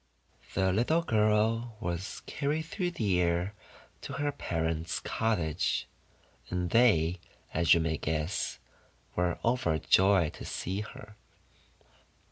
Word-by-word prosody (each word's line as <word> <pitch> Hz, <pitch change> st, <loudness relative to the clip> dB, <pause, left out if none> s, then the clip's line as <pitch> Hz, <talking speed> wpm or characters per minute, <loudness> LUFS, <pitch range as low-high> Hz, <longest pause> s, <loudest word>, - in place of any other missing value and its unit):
The 95 Hz, -1 st, +2 dB
little 155 Hz, -, +2 dB
girl 110 Hz, -1 st, +2 dB
was 90 Hz, -2 st, -4 dB
carried 150 Hz, +2 st, -1 dB
through 180 Hz, +3 st, -2 dB
the 105 Hz, -, 0 dB
air 85 Hz, +3 st, 0 dB, 0.5 s
to -, -, -6 dB
her 145 Hz, -1 st, -1 dB
parent's 80 Hz, -, -2 dB
cottage; 90 Hz, -8 st, 0 dB, 0.6 s
and 90 Hz, -1 st, -2 dB
they, 90 Hz, -8 st, +4 dB, 0.3 s
as 85 Hz, 0 st, +5 dB
you 85 Hz, -, +2 dB
may 80 Hz, -1 st, 0 dB
guess, 80 Hz, +5 st, -2 dB, 0.6 s
were 90 Hz, 0 st, +1 dB
overjoyed 95 Hz, -, +3 dB
to -, -, -9 dB
see 95 Hz, +3 st, -3 dB
her. 105 Hz, 0 st, -10 dB
95 Hz, 110 wpm, -30 LUFS, 85-115 Hz, 0.6 s, as